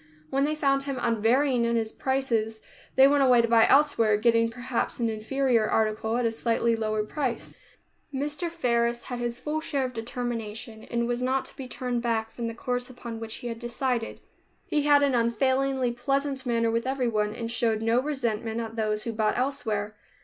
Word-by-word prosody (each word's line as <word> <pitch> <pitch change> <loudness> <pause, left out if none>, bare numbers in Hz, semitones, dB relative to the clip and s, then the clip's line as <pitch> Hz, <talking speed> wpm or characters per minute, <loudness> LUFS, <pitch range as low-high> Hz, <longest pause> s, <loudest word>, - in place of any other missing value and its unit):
When 275 +1 +2
they 305 +1 0
found 275 -2 +2
him 275 -2 -3
unvarying 240 +3 +2
in 235 0 +1
his 225 -1 0
prices, 230 -5 -1 0.4
they 265 +1 +8
went 285 0 +3
away 250 -3 +5
to - - +2
buy 230 -1 +5
elsewhere, 255 -7 +4
getting, 230 +1 +3
perhaps, 245 +2 -3
an 230 -1 +1
inferior 230 +1 +1
article 220 +1 +1
at 245 - 0
a 230 - +2
slightly 230 0 +1
lower 215 -1 -1
price. 260 +2 -3 0.6
Mr. 295 +5 -2
Faris 235 -7 0
had 245 -2 -5
his 240 0 -2
full 300 +5 -3
share 280 -4 -1
of 255 - -5
determination 225 -1 -5
and 235 0 -1
was 240 0 -1
not 260 +1 0
to - - -10
be 270 -2 -7
turned 250 -1 -3
back 225 -2 -1
from 235 0 -4
the 230 - -5
course 245 +1 -3
upon 235 -2 -7
which 225 0 -5
he 245 - -7
had 230 -1 -5
decided. 240 0 -2 0.4
He 300 - +1
had 290 -1 +5
an 280 -2 +2
unfailingly 260 +2 +1
pleasant 275 +2 -1
manner 230 -1 +2
with 230 +2 -1
everyone, 230 -6 0
and 230 -1 -4
showed 225 -2 0
no 230 +2 +3
resentment 235 -6 -2
at 225 -1 -5
those 215 -1 -1
who 230 - -3
bought 215 -1 +1
elsewhere. 220 -6 -2
240 Hz, 190 wpm, -27 LUFS, 225-265 Hz, 0.6 s, they